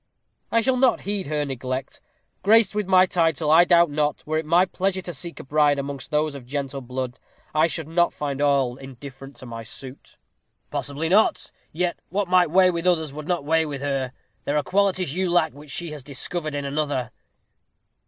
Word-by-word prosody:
"I 230 - +4
shall 255 +2 +2
not 260 0 +3
heed 200 -3 -2
her 150 0 -1
neglect. 130 -1 -5 0.4
Graced 215 +1 +5
with 210 -2 -2
my 185 -1 +6
title, 165 -4 +1
I 170 +2 +7
doubt 170 -3 +5
not, 150 0 -1
were 155 +1 0
it 160 - -6
my 175 +3 +5
pleasure 190 0 -1
to 175 - -6
seek 170 +3 -8
a - - -7
bride 145 +1 +3
amongst 140 -1 -5
those 150 0 0
of 135 -4 -10
gentle 140 0 -4
blood, 125 0 -5 0.3
I 155 +2 +4
should 160 -1 -4
not 170 +2 +2
find 140 -1 -4
all 135 -4 +2
indifferent 135 +1 -11
to - - -10
my 115 -1 -7
suit." 130 +4 -10 0.5
"Possibly 145 +3 -3
not. 200 +6 +2 0.2
Yet 175 +2 -1
what 200 +1 -1
might 180 -2 +4
weigh 185 +2 +5
with 170 +1 -2
others, 160 -5 +1
would 150 +1 -7
not 175 -5 -1
weigh 160 +1 +2
with 140 -2 -5
her. 135 -3 -1 0.3
There 145 - 0
are 150 - +1
qualities 190 -5 +1
you 185 +1 0
lack 170 -2 +2
which 145 +1 -13
she 170 +3 -4
has 150 -2 -7
discovered 150 +3 -4
in 140 -1 -3
another." 140 -4 -2
150 Hz, 195 wpm, -24 LUFS, 140-175 Hz, 0.5 s, I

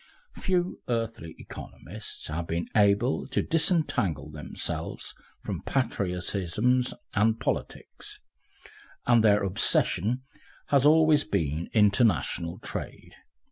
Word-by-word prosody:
Few 180 -1 0
earthly 115 -8 -3
economists - - -8
have 80 +2 -4
been 85 +1 -2
able 105 +4 +3
to 135 - 0
disentangle 125 - +1
themselves 75 -1 -5 0.3
from - - -4
patriotisms 105 +1 0 0.2
and 110 +1 +2
politics, - - -4 0.9
and 120 -2 +5
their 105 -1 +4
obsession 105 +5 +1 0.5
has 140 0 +5
always 155 -1 +5
been 80 +2 -2
international 100 - +2
trade. - - -7
110 Hz, 95 wpm, -27 LUFS, 85-130 Hz, 0.9 s, and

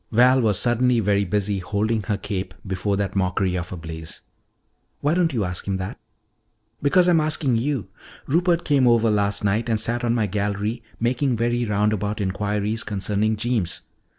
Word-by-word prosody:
Val 125 +3 +5
was 105 -5 +2
suddenly 120 +1 +2
very 100 -1 +2
busy 100 +1 -1
holding 105 +4 -1
her 100 +1 -2
cape 100 -1 -5
before 100 +1 -1
that 100 -1 -2
mockery 95 -1 0
of 90 0 -4
a 90 - -5
blaze. 80 -1 -8 0.8
"Why 145 +2 +2
don't 170 -2 +2
you 115 -6 -1
ask 90 0 -3
him 95 -1 0
that?" 95 +1 -6 0.8
"Because 175 +5 +4
I'm 170 -3 +4
asking 150 -5 +1
you. 130 -2 -1 0.4
Rupert 170 +3 +1
came 140 -4 +3
over 115 -2 +4
last 100 -1 +1
night 105 +4 0
and 110 -1 +1
sat 120 +3 -1
on 120 0 +1
my 110 -3 +1
gallery 105 +3 -2 0.2
making 125 +2 +1
very 120 +1 0
roundabout 105 0 0
inquiries 105 +3 -1
concerning 105 +1 0
Jeems. 105 -5 -1
105 Hz, 170 wpm, -23 LUFS, 100-120 Hz, 0.8 s, Val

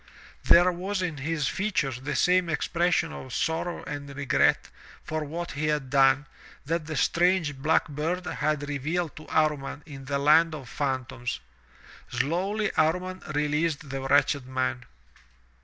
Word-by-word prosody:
there 175 +2 +7
was 185 +2 -3
in 165 -4 -3
his 150 +1 -1
features 155 - -1
the 145 +1 -3
same 180 +3 +3
expression 170 +1 +1
of 130 - -8
sorrow 165 +6 -2
and 145 -1 -6
regret 145 -1 +2 0.3
for 155 0 -3
what 165 +4 -5
he 155 +2 -2
had 150 -4 -1
done, 135 +1 +4 0.4
that 165 +1 -2
the 155 - -4
strange, 175 -4 +2
black 150 +4 +2
bird 165 +5 -2
had 150 -2 -1
revealed 155 +4 -2
to 155 - -11
Amman 150 -2 0
in 140 -4 -10
the 140 +1 -1
land 155 +3 +4
of 135 -5 -9
phan 130 +2 -1
toms. 120 - -5 0.7
Slowly 185 - 0
Amman 180 +4 +1 0.2
released 150 0 0
the 135 0 -3
wretched 140 0 +2
man. 130 -1 -2
150 Hz, 145 wpm, -27 LUFS, 140-170 Hz, 0.7 s, there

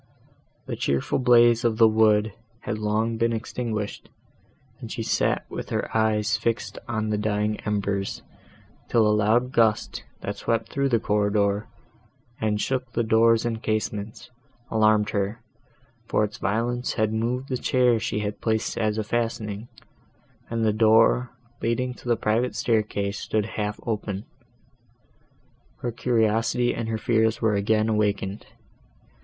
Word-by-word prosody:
The - - -4
cheerful 70 - 0
blaze 120 -2 +5
of 115 -2 +1
the 115 -1 +7
wood 110 -1 +3 0.3
had 110 - -4
long 110 +2 0
been 115 +1 +1
extinguished, 110 -2 -4 0.7
and - - -8
she - - -3
sat - - 0
with - - -6
her - - -3
eyes 110 -1 +2
fixed 115 0 -2
on 110 -2 -2
the 105 - 0
dying 105 0 0
embers, 100 -2 -2 0.7
till 115 -2 +4
a 105 - +3
loud 110 +4 +2
gust, 110 -4 +1 0.2
that - - -4
swept 115 -1 -1
through 140 0 0
the 115 -3 +2
corridor, 105 0 +1 0.7
and 105 -1 0
shook 130 +1 -2
the 120 - +1
doors 115 +1 +4
and 115 -1 -2
casements, 110 0 -3 0.4
alarmed 110 -1 +3
her, 100 +3 -2 0.7
for 105 - +2
its 105 0 -4
violence 120 +3 -1
had 110 -2 0
moved 125 +4 -2
the 130 - -1
chair 125 -2 +2
she 110 -2 -2
had 105 0 -4
placed 110 0 -1
as 110 -1 0
a 110 - 0
fastening, 110 -1 -3 0.8
and 115 -1 -1
the 110 - +2
door, 115 +3 +4 0.3
leading 125 +2 -1
to 125 - -13
the 120 - +3
private 115 +3 0
staircase 105 -3 0
stood 110 -2 -1
half 105 0 -3
open. 105 -2 -3 1.6
Her 120 - -2
curiosity 115 +1 +1
and 115 -1 -4
her 110 - -1
fears 110 0 +1
were 110 -2 +2
again 110 +2 +2
awakened. 105 -2 -1
110 Hz, 145 wpm, -25 LUFS, 105-115 Hz, 1.6 s, the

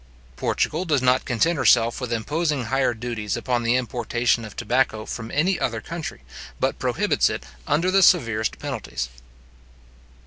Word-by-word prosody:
Portugal 160 - 0
does 155 -6 +2
not 125 +1 +3
content 145 +7 +1
herself 120 -2 +3
with 125 -2 -4
imposing 145 +4 -1
higher 130 +1 +1
duties 110 -3 -3
upon 125 -2 -1
the 120 +1 +2
importation 120 -1 0
of 110 -2 -9
tobacco 110 -2 0
from 115 0 -6
any 175 +8 +1
other 115 -2 -1
country, 160 - -7 0.4
but - - 0
prohibits - - +1
it - - -5 0.2
under 175 +5 +2
the 195 +1 +4
severest 115 - +3
penalties. 60 0 -4
120 Hz, 145 wpm, -23 LUFS, 115-150 Hz, 0.4 s, the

